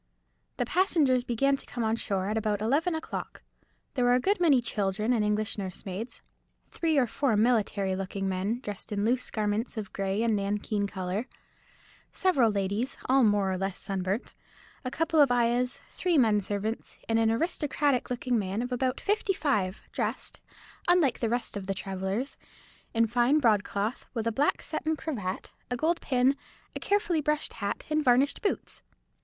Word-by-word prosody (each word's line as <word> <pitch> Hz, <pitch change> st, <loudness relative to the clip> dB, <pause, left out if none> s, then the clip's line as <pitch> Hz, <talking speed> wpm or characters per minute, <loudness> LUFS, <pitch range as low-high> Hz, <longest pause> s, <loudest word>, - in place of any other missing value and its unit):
The -, -, 0 dB
passengers 305 Hz, -9 st, +3 dB
began 275 Hz, +3 st, +2 dB
to -, -, -10 dB
come 240 Hz, -, -3 dB
on 220 Hz, 0 st, +2 dB
shore 195 Hz, -4 st, -2 dB
at 215 Hz, -, -1 dB
about 215 Hz, -2 st, 0 dB
eleven 295 Hz, -, +1 dB
o'clock. 320 Hz, -, -6 dB, 0.5 s
There 255 Hz, -, 0 dB
were 245 Hz, 0 st, +5 dB
a -, -, +3 dB
good 390 Hz, +9 st, +1 dB
many 310 Hz, -7 st, +5 dB
children 210 Hz, 0 st, 0 dB
and 225 Hz, -3 st, +2 dB
English 210 Hz, +1 st, 0 dB
nursemaids; 195 Hz, +3 st, -6 dB, 0.5 s
three 320 Hz, -3 st, +1 dB
or 265 Hz, -, +5 dB
four 235 Hz, 0 st, 0 dB
military 210 Hz, -4 st, +2 dB
looking 195 Hz, +1 st, -3 dB
men, 195 Hz, +6 st, -1 dB
dressed 205 Hz, -4 st, -7 dB
in 205 Hz, 0 st, 0 dB
loose 250 Hz, +2 st, +1 dB
garments 215 Hz, +2 st, -1 dB
of 210 Hz, -3 st, -5 dB
grey 195 Hz, +2 st, -1 dB
and 230 Hz, -2 st, +2 dB
nankeen 205 Hz, +1 st, -1 dB
colour; 190 Hz, +4 st, -3 dB, 0.8 s
several 280 Hz, -12 st, +3 dB
ladies, 205 Hz, +6 st, -1 dB
all 265 Hz, 0 st, +4 dB
more 205 Hz, -3 st, +3 dB
or 185 Hz, -, -2 dB
less 195 Hz, -1 st, -2 dB
sunburnt; 195 Hz, +3 st, -3 dB, 0.5 s
a 255 Hz, -, -2 dB
couple 325 Hz, +3 st, +1 dB
of 280 Hz, -3 st, +5 dB
ayahs; 245 Hz, +1 st, +1 dB
three 355 Hz, -3 st, +1 dB
men 220 Hz, -5 st, +4 dB
servants; 205 Hz, +3 st, -3 dB
and 225 Hz, 0 st, +2 dB
an 225 Hz, -1 st, +3 dB
aristocratic 285 Hz, 0 st, +1 dB
looking 250 Hz, -1 st, 0 dB
man 200 Hz, +3 st, -2 dB
of 250 Hz, -, -5 dB
about 255 Hz, +1 st, 0 dB
fifty 405 Hz, -1 st, +1 dB
five, 210 Hz, -, 0 dB
dressed, -, -, -3 dB, 0.5 s
unlike 350 Hz, -7 st, +4 dB
the 230 Hz, -, 0 dB
rest 240 Hz, -1 st, -2 dB
of 195 Hz, -2 st, -5 dB
the 195 Hz, -, -1 dB
travellers, 195 Hz, +7 st, -3 dB, 0.5 s
in 230 Hz, -1 st, +3 dB
fine 240 Hz, +5 st, +3 dB
broadcloth, 215 Hz, -3 st, +1 dB
with 225 Hz, -1 st, -1 dB
a 230 Hz, -, +1 dB
black 275 Hz, +7 st, +1 dB
satin 315 Hz, 0 st, -2 dB
cravat, 215 Hz, -12 st, -4 dB, 0.2 s
a 245 Hz, -, -1 dB
gold 330 Hz, +6 st, +1 dB
pin, 260 Hz, +1 st, +3 dB, 0.4 s
a -, -, -3 dB
carefully 405 Hz, -6 st, +1 dB
brushed 300 Hz, 0 st, 0 dB
hat, 200 Hz, -3 st, -3 dB
and 305 Hz, 0 st, +2 dB
varnished 260 Hz, +2 st, +3 dB
boots. 410 Hz, -, -2 dB
230 Hz, 170 wpm, -28 LUFS, 205-275 Hz, 0.8 s, were